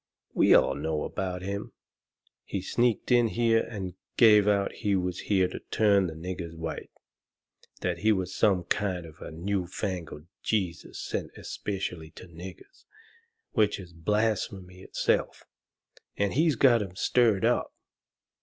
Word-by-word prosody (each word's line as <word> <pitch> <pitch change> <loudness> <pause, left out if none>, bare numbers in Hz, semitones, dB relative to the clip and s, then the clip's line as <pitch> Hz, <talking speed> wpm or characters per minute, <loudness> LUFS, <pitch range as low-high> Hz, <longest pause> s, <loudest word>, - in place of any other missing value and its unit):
We - - +3
know - - +8
all 75 +1 -2
about 90 -2 -4
him. 100 +1 -4 0.7
He 100 - -3
sneaked 120 +6 0
in 120 -1 +5
here 115 0 +2
and 95 -5 -5 0.2
gave 105 -3 +7
out 100 -1 +2
he 105 -3 0
was 90 -1 -1
here 95 -3 +4
to - - -6
turn 100 -3 +3
the 80 - -6
niggers 85 0 -6
white 80 0 -5 0.9
that - - -1
he 110 +1 +3
was 95 -3 -1
some 95 -4 +3
kind 90 -1 -1
of 80 +1 -14
a - - -6
new 90 +3 -2
fangled 85 -5 -5 0.2
Jesus 95 -6 -2
sent - - -3
especially 90 -5 -4
to - - -10
niggers, 95 - -12 0.7
which 105 -3 +2
is 90 -3 -11
blasphemy 95 0 -1
in - - -12
itself - - 0 0.7
and 100 -1 +1
he's 155 +1 +3
got 120 -2 +5
'em 95 -3 -6
stirred 110 0 +3
up. - - +1
95 Hz, 145 wpm, -28 LUFS, 90-105 Hz, 0.9 s, know